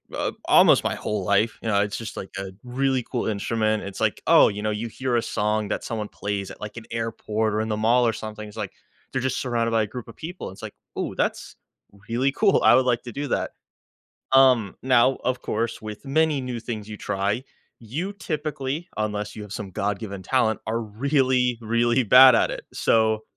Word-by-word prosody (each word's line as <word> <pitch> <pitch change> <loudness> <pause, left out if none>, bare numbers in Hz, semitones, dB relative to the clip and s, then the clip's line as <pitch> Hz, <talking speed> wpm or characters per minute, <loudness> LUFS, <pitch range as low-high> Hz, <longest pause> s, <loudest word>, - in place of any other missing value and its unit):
uh, - - -1
almost - - +6
my - - 0
whole 105 -3 -3
life. 100 +4 +2
You - - -5
know? 100 -2 +3
It's 105 0 -2
just 115 -2 -7
like 95 - -6
a 95 -1 -5
really 130 +1 0
cool 120 - -1
instrument. 110 0 0
It's 100 -1 -7
like, - - 0
oh, - - +7
you 105 0 -3
know, 110 - 0
you 105 +2 -3
hear 125 +1 -1
a - - +2
song 105 -1 -1
that - - -3
someone 110 -2 -3
plays 100 -1 -4
at, - - -13
like, 105 +2 -7
an 115 - -8
airport 110 -1 -2
or 105 - 0
in 110 - -2
the 105 -1 -1
mall 120 +3 +3
or 115 - +1
something. 110 0 -7
It's 105 +1 -13
like, 105 -3 -4 0.4
they're 135 - -1
just 130 0 -1
surrounded 115 -2 0
by 115 -1 +3
a - - -3
group 125 +2 -8
of 115 - -12
people. 175 - -7
It's 95 - -13
like, - - -8 0.2
"Ooh, - - -3
that's - - -2 0.5
really 130 +4 +1
cool. 195 +6 +3
I - - +7
would 130 0 +4
like 120 -1 +1
to 120 - -7
do 145 +5 -4
that." - - -1 0.8
Um, 130 -7 +5
now, 130 0 +4
of 125 0 -1
course, 115 +2 -2
with 105 +4 -8
many 155 +1 +2
new 125 -2 -4
things 110 -3 -6
you 105 -1 -7
try, 100 +5 -1 0.4
you 150 - -4
typically- 155 -3 -4
unless 105 -1 -2
you 110 - -7
have 105 -2 -10
some 100 -3 -6
God-given 100 0 -3
talent- 110 -3 +1
are 115 +1 0
really, 125 +2 +1
really 120 +2 +2
bad 125 +3 +8
at - - +2
it. - - -6
So, 110 -1 +2
115 Hz, 215 wpm, -24 LUFS, 105-130 Hz, 0.8 s, bad